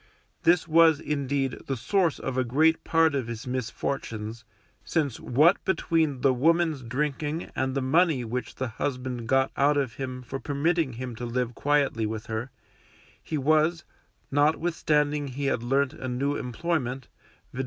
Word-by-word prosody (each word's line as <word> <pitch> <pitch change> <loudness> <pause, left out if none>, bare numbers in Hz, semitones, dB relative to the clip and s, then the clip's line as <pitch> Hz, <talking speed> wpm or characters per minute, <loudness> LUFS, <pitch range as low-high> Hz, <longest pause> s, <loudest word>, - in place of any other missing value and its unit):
This 170 -1 +3
was, 160 -2 +5
indeed, 140 -3 -2
the 135 - -2
source 175 - +1
of 130 - -4
a 130 - +2
great 155 +7 +2
part 165 -2 +3
of 135 -5 -1
his 115 -1 -6
misfortunes, 115 -3 -4 0.4
since 140 +1 -1
what 155 +9 +3
between 160 -7 0
the 135 0 +4
woman's 160 +2 +2
drinking 150 +5 -3
and 130 0 -1
the 135 - 0
money 150 -2 +2
which 125 +3 -4
the 130 - -2
husband 125 0 -4
got 135 +2 +2
out 145 +1 +3
of 135 -5 0
him 130 -1 -5
for 135 +3 -5
permitting 145 0 0
him 125 0 -6
to 120 - -5
live 120 0 -1
quietly 140 -5 +1
with 110 0 -5
her, 110 +3 -4 0.7
he 155 - -3
was 155 +4 +2 0.5
(notwithstanding 150 -1 +1
he 140 +2 -4
had 125 - 0
learnt 135 +3 +1
a 130 - -6
new 135 +3 -1
employment, 130 -1 -2 0.5
viz. 125 - -7
135 Hz, 155 wpm, -27 LUFS, 125-155 Hz, 0.7 s, was